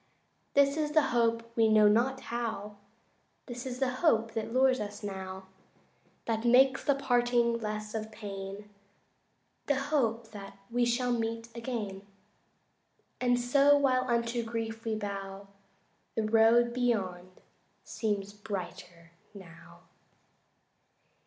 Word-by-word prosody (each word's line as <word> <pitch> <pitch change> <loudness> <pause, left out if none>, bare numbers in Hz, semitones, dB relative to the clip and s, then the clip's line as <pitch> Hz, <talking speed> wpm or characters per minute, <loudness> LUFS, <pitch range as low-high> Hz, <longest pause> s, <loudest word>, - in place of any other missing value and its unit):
This 280 +1 +4
is 300 -1 -1
the 310 -1 +5
hope 230 -1 +1
we 225 -1 +4
know 215 -1 +6
not 245 +5 +2
how 220 -3 -4 0.7
This 245 0 -7
is 250 -1 -5
the 260 -1 0
hope 225 -9 +2
that 225 0 -3
lures 260 +1 +3
us 205 0 -6
now, 190 -1 -6 0.8
That 225 -1 -1
makes 260 +2 +4
the 285 - +2
parting 240 -3 +2
less 215 -1 -5
of 220 0 -4
pain 200 -1 -7 1.0
The 285 - +2
hope 245 -5 -1
that 200 -2 -10
we 240 +1 +2
shall 245 +1 0
meet 230 0 -3
again, 230 -5 -4 1.2
And 245 -1 +2
so 280 +4 +4
while 255 -2 +2
unto 235 0 0
grief 225 0 -4
we 220 -1 -1
bow 200 -1 -6 0.7
The 225 - 0
road 225 +2 +4
beyond 195 -8 -1 0.5
seems 205 -2 -3
brighter 180 -5 -7 0.2
now. 170 -2 -14
230 Hz, 120 wpm, -30 LUFS, 205-245 Hz, 1.2 s, know